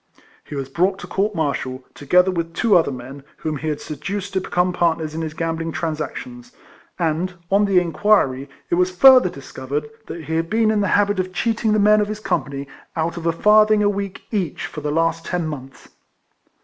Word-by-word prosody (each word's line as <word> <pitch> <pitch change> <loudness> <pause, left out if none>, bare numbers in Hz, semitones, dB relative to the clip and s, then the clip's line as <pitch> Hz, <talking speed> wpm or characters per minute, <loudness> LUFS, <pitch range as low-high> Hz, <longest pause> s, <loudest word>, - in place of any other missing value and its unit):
He - - -9
was 135 -2 -3
brought 185 +7 +1
to - - -8
court 205 +2 -1
martial, 135 -5 -2
together 180 +6 +3
with 170 -1 -3
two 220 -4 +3
other 165 -4 +4
men, 130 +2 -8 0.2
whom 155 -2 -3
he 155 - -5
had 150 -1 -1
seduced 195 +7 -5
to 190 - 0
become 180 0 0
part 170 -2 +2
ners 155 -1 -5
in 160 - -4
his 155 -1 -5
gambling 165 0 -2
transactions; 240 - -5 0.4
and, 175 +2 -1 0.2
on 200 +1 +4
the 195 -2 +4
inquiry, 165 -7 +1 0.2
it - - +4
was 180 - +2
further 255 +2 +7
discovered 140 0 -5 0.2
that 165 - -7
he 160 +1 -3
had 165 0 -1
been 220 0 +2
in 210 -1 +1
the 200 - +1
habit 205 -1 +1
of 185 0 -2
cheating 225 +2 0
the - - +3
men 210 +1 +5
of 205 - 0
his 215 0 -5
company 140 -9 -2 0.3
out 165 +1 -1
of 170 -1 -4
a - - +4
farthing 210 +4 +4
a 205 - +4
week 200 -2 -4
each 190 -9 -2
for - - -7
the 150 - -2
last 165 +2 0
ten 175 -1 -2
months. 135 -3 -9
170 Hz, 205 wpm, -21 LUFS, 155-205 Hz, 0.4 s, further